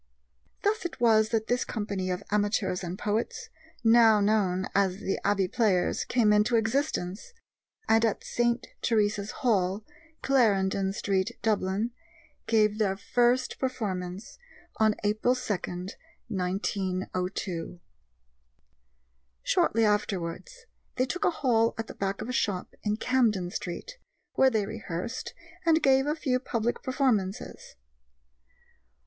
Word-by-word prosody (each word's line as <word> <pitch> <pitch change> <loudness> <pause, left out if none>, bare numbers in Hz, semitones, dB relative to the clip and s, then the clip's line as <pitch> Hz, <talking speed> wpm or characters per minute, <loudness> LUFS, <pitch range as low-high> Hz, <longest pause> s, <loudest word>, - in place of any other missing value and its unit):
Thus 420 +2 +1
it 345 -6 -5
was 220 -2 +4
that 225 -1 0
this 245 +2 0
company 200 -4 -3
of 180 +2 -2
amateurs 205 -3 0
and 175 +1 -4
poets, 215 +2 -2 0.3
now 225 -2 +6
known 200 -3 +1
as 195 -2 +2
the 195 -1 -2
Abbey 200 -2 +2
Players, 195 -3 +1
came 225 -4 +3
into 210 +3 +3
existence, 225 - -1 0.5
and 225 +1 +4
at 225 -3 0
St. 240 0 0 0.2
Teresa's 205 -3 +1 0.2
Hall, 200 -2 +1 0.4
Clarendon 195 -7 +2
Street, 195 -2 -1
Dublin, 210 +1 0 0.6
gave 215 -1 +3
their 195 -3 +1
first 245 +5 +1
performance 195 - -4 0.4
on 215 -1 +3
April 215 +4 +2
2, 250 -4 -2 0.8
1902. 185 -2 -3 1.6
Shortly 225 0 +2
afterwards 210 - -2 0.3
they 255 - +2
took 355 +8 -2
a - - +5
hall 235 -8 +1
at 225 - -3
the - - -9
back 195 0 -3
of - - -7
a - - -3
shop 200 -6 -1
in 210 0 -1
Camden 220 -9 +1
Street, - - -6 0.3
where 265 - +5
they 220 -5 0
rehearsed 215 +1 -5 0.3
and 325 -2 +3
gave 270 +1 +4
a 300 - +1
few 255 -5 0
public 235 -2 -2
performances. 235 -7 -1
215 Hz, 120 wpm, -28 LUFS, 195-240 Hz, 1.6 s, now